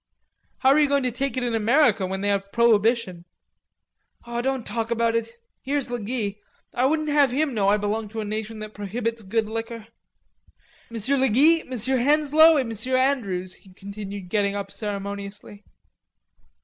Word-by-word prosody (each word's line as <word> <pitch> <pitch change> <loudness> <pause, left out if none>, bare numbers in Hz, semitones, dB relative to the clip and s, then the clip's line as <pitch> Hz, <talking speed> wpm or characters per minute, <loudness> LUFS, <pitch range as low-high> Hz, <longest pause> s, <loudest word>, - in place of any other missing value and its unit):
"How 265 - +5
are 290 - +5
you 295 - +4
going 280 -1 +1
to 250 - 0
take 265 +2 -3
it 255 - -1
in 240 -1 -1
America 225 -2 +3
when 190 +1 -4
they 205 - 0
have 200 0 -1
prohibition?" 225 -5 +2 1.0
"Don't 240 +1 -2
talk 230 -1 -3
about 230 -1 +1
it; 230 - -2 0.3
here's 280 -2 -2
le 245 - -2
Guy. 210 -2 -3 0.4
I 255 +2 +2
wouldn't 310 +1 0
have 290 -2 +4
him 280 +2 0
know 205 -4 +1
I 205 +1 +4
belong 210 +1 -2
to 220 +2 -7
a 215 - -3
nation 215 +1 -4
that 215 0 -8
prohibits 225 +3 -3
good 220 +2 -1
liquor.... 225 0 -5 1.0
Monsieur 235 +4 0
le 265 0 +3
Guy, 310 +9 +5
Monsieur 260 +1 0
Henslowe 300 +4 +5
et 265 - +1
Monsieur 230 +3 -1
Andrews," 200 -9 0
he 190 - -18
continued 200 -1 -8
getting 200 0 0
up 200 -1 -5
ceremoniously. 200 0 -6
230 Hz, 170 wpm, -24 LUFS, 205-260 Hz, 1.0 s, How